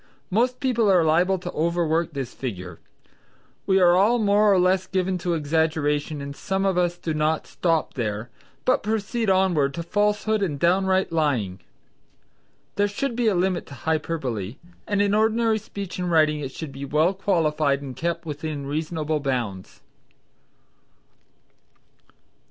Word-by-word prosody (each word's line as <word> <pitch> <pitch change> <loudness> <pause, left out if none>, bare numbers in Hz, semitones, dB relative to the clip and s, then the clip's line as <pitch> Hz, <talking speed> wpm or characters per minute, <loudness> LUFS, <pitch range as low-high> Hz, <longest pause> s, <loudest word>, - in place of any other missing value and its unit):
Most 245 +5 +1
people 235 -5 +2
are 180 -3 +5
liable 175 +5 +3
to 180 - -6
overwork 170 0 0
this 135 -3 -5
figure. 90 -9 -6 0.9
We 190 0 +4
are 175 -1 +5
all 210 +6 +4
more 210 -1 +4
or 195 - +4
less 185 +1 +2
given 185 0 -1
to 175 0 -1
exaggeration 150 -1 0
and 140 0 -6
some 190 +4 -2
of 190 -2 +2
us 175 -1 +1
do 165 -2 -3
not 155 +1 0
stop 165 -3 -1
there, 110 -1 -3 0.3
but 255 - +3
proceed 220 +1 -1
onward 175 -8 +2
to 170 - -4
falsehood 210 +3 +1
and 165 -8 -1
downright 190 +2 +2
lying. 130 - 0 1.2
There 205 0 +3
should 235 +5 -3
be 240 -1 +1
a 210 - +3
limit 180 0 0
to 140 - -10
hyperbole, 135 - -2 0.3
and 205 -1 +2
in 200 0 +1
ordinary 220 +1 +2
speech 200 -3 -7
and 180 -1 -1
writing 155 -2 +3
it 135 -2 -5
should 155 +1 -7
be 135 +1 -8
well 155 +6 +2
qualified 155 -7 +1
and 130 -2 -7
kept 170 +4 -3
within 150 -1 -5
reasonable 155 +1 -2
bounds. 120 -9 -3
170 Hz, 150 wpm, -24 LUFS, 145-195 Hz, 1.2 s, are